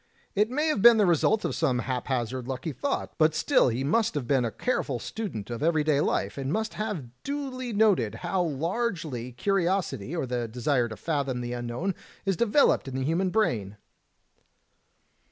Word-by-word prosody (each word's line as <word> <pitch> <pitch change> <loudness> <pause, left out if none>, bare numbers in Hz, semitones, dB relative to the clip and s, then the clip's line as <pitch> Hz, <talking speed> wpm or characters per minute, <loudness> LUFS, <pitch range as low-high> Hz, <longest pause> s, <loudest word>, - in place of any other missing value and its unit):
It 210 +2 +2
may 295 +5 0
have 300 - 0
been 235 0 +8
the 210 - +4
result 185 +5 +2
of - - -1
some 140 -6 +1
haphazard 125 -1 -2
lucky 135 +4 -3
thought, 280 - -3
but 155 0 +4
still 155 - +3
he 120 +3 -2
must 220 +9 +1
have 145 -4 -2
been 135 -1 +3
a 115 - 0
careful 145 - -1
student 125 - -5
of 120 - -4
every 160 -1 +2
day 150 -2 +2
life, 145 - -1
and 135 0 -2
must 220 +5 -1
have 205 - -4
duly 270 -3 -4
noted 205 - +3
how 180 +1 +1
largely 160 - -2
curiosity 175 - -1
or 160 - -1
the 120 -2 -2
desire 125 +1 0
to 110 - -7
fathom 140 -6 -1
the 120 0 -4
unknown 120 +10 -2 0.3
is 195 -1 +1
developed 235 - +3
in 130 - -5
the 130 - -1
human 170 +6 +1
brain." 115 - 0
155 Hz, 175 wpm, -27 LUFS, 125-205 Hz, 0.3 s, been